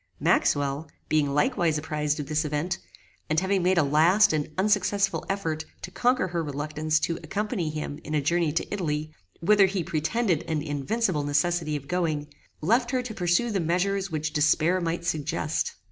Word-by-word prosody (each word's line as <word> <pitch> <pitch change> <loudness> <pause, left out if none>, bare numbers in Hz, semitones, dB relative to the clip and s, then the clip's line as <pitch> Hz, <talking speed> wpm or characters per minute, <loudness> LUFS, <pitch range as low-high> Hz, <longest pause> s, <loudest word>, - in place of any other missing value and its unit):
Maxwell, 145 +2 +1 0.2
being 150 -2 +2
likewise 155 +2 +2
apprized 150 -1 -1
of 150 - -3
this 155 +3 0
event, 150 +4 -2 0.5
and 155 +1 +3
having 190 +1 +1
made 185 +1 +2
a 165 - +5
last 165 +8 +4
and 150 -1 -1
unsuccessful 200 0 +1
effort 165 -6 -2 0.2
to 180 - -6
conquer 245 -1 +1
her 170 -1 -1
reluctance 155 +2 -1
to 165 - -1
accompany 195 +1 -2
him 150 -1 -5
in 155 - -3
a - - +3
journey 165 +2 +1
to 165 - -2
Italy, 155 -5 -2 0.3
whither 200 +2 +5
he 190 -2 -2
pretended 170 +3 0
an 155 -2 -1
invincible 150 - -1
necessity 155 +2 0
of 140 -1 -6
going, 155 -4 -1 0.3
left 235 +9 +2
her 255 -1 0
to 240 -3 -6
pursue 180 +5 +1
the 200 - 0
measures 185 +4 0
which 155 -1 -3
despair 155 +4 +3
might 170 0 -2
suggest. 160 -1 -1
165 Hz, 170 wpm, -26 LUFS, 150-190 Hz, 0.5 s, a